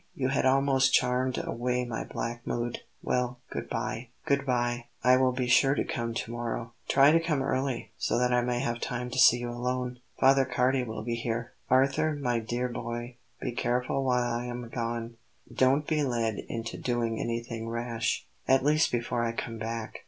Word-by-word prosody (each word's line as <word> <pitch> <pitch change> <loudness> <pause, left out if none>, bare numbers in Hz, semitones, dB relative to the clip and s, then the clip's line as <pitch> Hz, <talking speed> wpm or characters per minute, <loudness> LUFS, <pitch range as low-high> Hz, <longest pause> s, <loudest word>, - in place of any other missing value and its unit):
You 130 -1 0
had 135 -1 +2
almost 135 -1 +3
charmed 125 0 +1
away 125 +1 -1
my 115 -2 -3
black 120 +1 -5
mood. 120 0 -2 0.2
Well, 125 0 0
good - - -5
bye." 115 +3 -3 0.2
"Good 140 -2 +1
bye. 120 -1 0 0.2
I 125 +1 +6
will 130 0 +3
be 125 0 -1
sure 135 +3 +4
to - - +1
come 115 -1 -3
to 115 - -3
morrow." 120 -1 -4
"Try 140 +2 +6
to 165 - +5
come 155 -5 0
early, 130 -4 -1
so - - +1
that 125 0 +2
I 125 - +4
may 120 0 0
have 120 -3 -1
time 125 +1 -3
to 130 - -1
see 120 - +8
you 120 0 -4
alone. 125 +1 -2 0.2
Father 135 0 +6
Cardi 130 0 +1
will 110 -2 -5
be 120 +1 -2
here. 115 0 -3 0.2
Arthur, 140 +4 +3
my 125 -5 0
dear 120 +3 -2
boy, 120 0 -5 0.2
be - - -2
careful 125 +3 0
while 125 -2 +2
I 120 +1 -2
am 120 -1 -5
gone; 115 -1 -3 0.4
don't 135 +3 +3
be 155 0 +1
led 115 -5 0
into 115 -1 -4
doing 120 -2 -1
anything 115 -1 -3
rash, 115 -1 -2 0.2
at 130 0 +4
least 155 +2 +3
before 120 0 -1
I 115 0 -1
come 115 -1 -5
back. 115 0 -4
120 Hz, 190 wpm, -29 LUFS, 115-130 Hz, 0.4 s, see